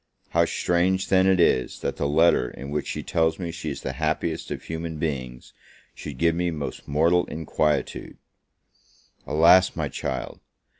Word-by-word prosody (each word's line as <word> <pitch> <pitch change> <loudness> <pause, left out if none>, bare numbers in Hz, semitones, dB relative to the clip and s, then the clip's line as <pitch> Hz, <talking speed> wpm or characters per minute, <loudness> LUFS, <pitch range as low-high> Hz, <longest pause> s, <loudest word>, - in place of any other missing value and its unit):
How - - +3
strange, 95 +2 0
then, 95 0 +4
is 85 -9 +2
it, - - -16
that - - -2
the 70 - 0
letter 80 +4 +3
in 70 +3 -9
which 75 0 -2
she - - -4
tells 80 -1 +1
me 85 -3 -4
she 85 -2 -5
is 70 - -5
the 65 - -3
happiest 80 +1 -1
of - - -5
human 80 0 -5
beings, 65 -6 -4 0.4
should 70 -4 -8
give 85 +2 +2
me 90 +1 0
most 75 -4 -6
mortal 85 +5 +3
inquietude! 75 -1 -2 1.1
Alas, 85 +5 +5
my 80 -4 -2
child! 65 -1 -5
80 Hz, 160 wpm, -24 LUFS, 75-85 Hz, 1.1 s, Alas